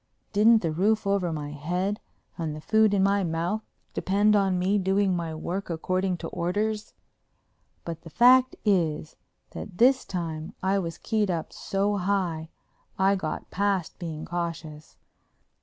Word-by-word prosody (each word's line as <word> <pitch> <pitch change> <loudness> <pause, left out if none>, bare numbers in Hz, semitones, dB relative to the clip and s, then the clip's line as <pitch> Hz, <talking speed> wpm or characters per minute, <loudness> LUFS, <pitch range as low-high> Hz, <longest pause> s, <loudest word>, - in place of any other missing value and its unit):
Didn't 220 +1 +5
the 165 - 0
roof 205 +7 +1
over 195 -3 +1
my 150 -2 -4
head 180 +8 -2 0.4
and 160 -3 -3
the - - -7
food 220 +6 +3
in 200 -2 +2
my 200 0 +3
mouth 170 +5 -1 0.3
depend 205 +2 +2
on 195 -2 +2
me 190 +3 +2
doing 195 0 +2
my 165 -2 -3
work 180 +5 -4
according 185 +2 -1
to - - -6
orders? 210 +5 -2 0.9
But 165 -1 -5
the 165 - -11
fact 255 +6 +5
is 160 -6 +1 0.4
that - - -7
at 185 -4 -9
this 260 +2 +5
time 165 -3 -5
I 195 +1 +2
was 165 -3 -4
keyed 215 -3 0
up 170 -3 -3
so 200 0 -1
high 180 -5 -1 0.5
I'd 195 +1 +3
got 155 -4 -5
past 200 -3 -1
being 160 -3 -5
cautious. 165 -3 -5
185 Hz, 155 wpm, -26 LUFS, 165-205 Hz, 0.9 s, Didn't